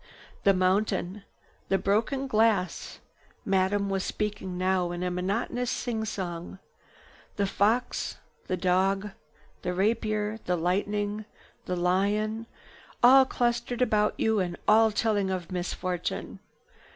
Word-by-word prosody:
"The 200 - +6
mountain, 190 +1 0 0.4
the 195 - +3
broken 230 +8 0
glass—" 215 -7 +1 0.5
Madame 195 +1 +1
was 195 -1 -1
speaking 205 -4 -3
now 185 -1 +1
in 175 +1 -4
a 180 - -1
monotonous 205 +7 -1
singsong. 195 -9 -3 0.8
"The 200 - +1
fox, 215 +5 0 0.3
the 185 - -1
dog, 195 +3 +1 0.5
the 180 - -2
rapier, 215 +1 0
the 180 - +1
lightning, 205 +4 -1 0.4
the 180 - -2
lion, 205 +5 0 0.6
all 265 +2 +8
clustered 240 0 0
about 210 -3 +2
you 220 -1 +2
and 175 -2 -2
all 220 +1 +6
telling 210 -2 +1
of 185 -1 -4
misfortune! 180 0 -3
200 Hz, 115 wpm, -28 LUFS, 185-220 Hz, 0.8 s, all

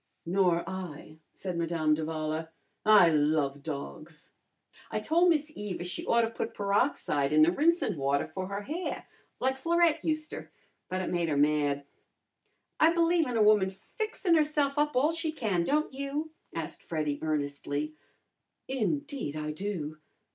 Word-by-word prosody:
"Nor 175 -1 +2
I," 170 -5 -7 0.2
said 180 -3 -4
Madame 165 -2 +1
d'Avala; 155 0 -2 0.3
"I 210 -6 +7
love 145 -2 +1
dogs." 140 - -7 0.6
"I 215 - -1
tole 335 +10 +3
Miss 305 -2 +1
Eva 200 -4 -4
she 180 - -5
ought 235 - +4
to 225 0 0
put 225 0 -4
peroxide 200 - +1
in 155 0 +6
the 165 - +5
rinsin' 310 - +2
water 140 +1 +1
for 185 -1 -5
her 200 +1 -4
hair 325 - -4 0.3
like 265 +1 0
Florette 335 +1 +3
useter, 310 -1 -3 0.4
but 185 0 -1
it - - -3
made 170 -2 0
her 145 - 0
mad. 145 -1 +2 0.9
I 320 +1 +6
b'lieve 335 -1 +3
in 245 -2 -1
a 215 - +5
woman 210 -3 +5
fixin' 370 - -2
herself 300 -2 +2
up 295 -1 +1
all 285 +5 +4
she 325 -1 -2
can, 215 - 0
don't 300 - 0
you?" 280 +3 -3 0.2
asked - - -5
Freddy 150 -3 -2
earnestly. 145 0 -2 0.7
"Indeed, 265 - -2
I 155 0 -3
do! 155 -3 -4
195 Hz, 150 wpm, -29 LUFS, -, 0.9 s, I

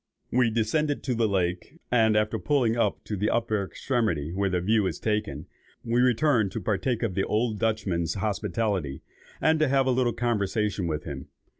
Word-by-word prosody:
We 125 -1 +3
descended 130 +7 0
to 130 - -1
the 115 -1 +1
lake, 90 - -2
and 110 -3 +4
after 105 +1 0
pulling 125 -6 +1
up 120 - 0
to 105 - -4
the 105 +3 0
upper 110 -3 0
extremity 95 - -1
where 100 +1 0
the 90 -1 0
view 105 +2 +2
is 85 - -3
taken, 105 -10 -2 0.4
we 120 +1 +2
returned 125 -4 +3
to - - -2
partake 110 +4 -1
of 110 -5 -1
the 95 +1 0
old 110 0 0
Dutchman's 95 -7 0
hospitality, 100 - -2 0.4
and 160 0 +2
have 135 -2 +3
a 130 - +2
little 125 -2 +1
conversation 105 -4 -1
with 75 -2 -2
him. - - -7
110 Hz, 175 wpm, -26 LUFS, 95-120 Hz, 0.4 s, and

